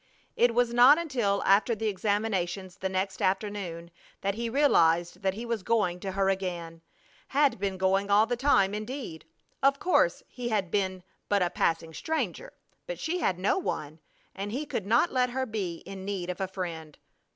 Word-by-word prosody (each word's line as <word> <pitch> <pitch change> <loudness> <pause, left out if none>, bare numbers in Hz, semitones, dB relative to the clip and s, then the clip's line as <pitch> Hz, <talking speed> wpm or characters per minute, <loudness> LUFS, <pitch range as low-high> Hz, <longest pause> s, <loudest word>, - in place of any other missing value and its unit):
It 240 -1 +3
was 240 -1 +2
not 250 +5 +8
until 240 -12 0
after 205 +4 +4
the 220 +1 -4
examinations 195 -3 -1
the 190 - -2
next 190 0 -2
afternoon 190 -4 -2 0.3
that 200 +1 0
he 230 +2 -3
realized 175 - +3
that 190 -1 0
he 230 +3 -6
was 230 -3 -2
going 185 -4 +1
to 190 0 -5
her 195 0 +1
again; 175 -4 -3 0.5
had 280 -5 +2
been 195 -1 -2
going 195 +1 +1
all 205 +2 +5
the 245 +1 -1
time, 220 -7 +3
indeed! 215 - -6 0.4
Of 275 +1 +4
course 435 +7 +2
he 245 -1 -5
had 200 -5 -1
been 190 -3 -1 0.3
but 200 -2 +3
a 175 - -1
passing 165 0 0
stranger, 320 - -3 0.4
but - - -4
she 350 +3 -2
had 190 - 0
no 195 - +1
one, 155 - -4 0.3
and 200 +1 -5
he 275 +7 -3
could 205 -8 -4
not 235 +10 +3
let 250 -1 +2
her 260 +1 -2
be 195 -8 -4
in 195 -1 -8
need 190 -3 -3
of 180 - -7
a 190 - 0
friend. 170 -5 -6
200 Hz, 185 wpm, -28 LUFS, 185-240 Hz, 0.5 s, not